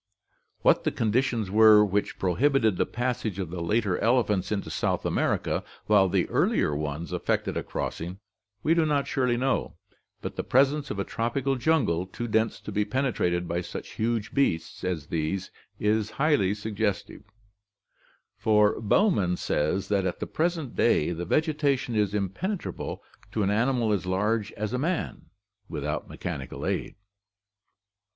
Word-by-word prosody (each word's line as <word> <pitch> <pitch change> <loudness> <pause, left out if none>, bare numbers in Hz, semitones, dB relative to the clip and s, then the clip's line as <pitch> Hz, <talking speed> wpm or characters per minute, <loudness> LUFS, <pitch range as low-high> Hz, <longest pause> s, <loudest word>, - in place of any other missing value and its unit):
What - - +4
the - - +2
conditions 115 -2 0
were 110 0 +7
which 100 +1 -1
prohibited 110 +3 +2
the - - +1
passage 120 -4 -2
of 90 -4 -4
the 90 -1 -4
later 100 +1 +1
elephants 110 -6 +2
into 100 -2 -2
South - - -1
America, - - 0 0.2
while 100 -3 +4
the - - +1
earlier 75 - +2
ones 75 +2 -4
effected - - -1
a - - -1
crossing, 85 +3 -4 0.5
we 160 - +4
do 165 -1 +3
not 145 -2 +1
surely 125 -3 +1
know, 130 +1 0 0.4
but - - -6
the - - -1
presence 140 +3 +2
of - - -4
a 100 - 0
tropical 125 +6 -1
jungle 120 - +1
too 120 +5 -5
dense 110 0 +1
to - - -7
be 105 +1 +1
penetrated 105 -7 0
by 85 +1 -1
such - - -7
huge 115 -1 -2
beasts 85 -12 0
as 90 -5 -2
these 80 +4 -2 0.3
is 105 0 +1
highly 140 -10 +2
suggestive, 105 -1 -3 1.1
for 105 0 +3
Bowman 105 - +2
says 75 +6 0
that 100 -2 +2
at 90 - -4
the - - -2
present 160 -5 -2
day 85 -8 +3
the 85 +1 -4
vegetation 145 - +1
is 105 -1 +1
impenetrable 135 - -3 0.3
to 110 - 0
an 100 - +1
animal 115 0 +2
as 95 -2 -2
large 105 +3 0
as 110 +2 -4
a 125 - 0
man, 170 +4 -2 0.4
without - - -3
mechanical 65 -2 -5
aid. - - -2
105 Hz, 150 wpm, -27 LUFS, 95-130 Hz, 1.1 s, were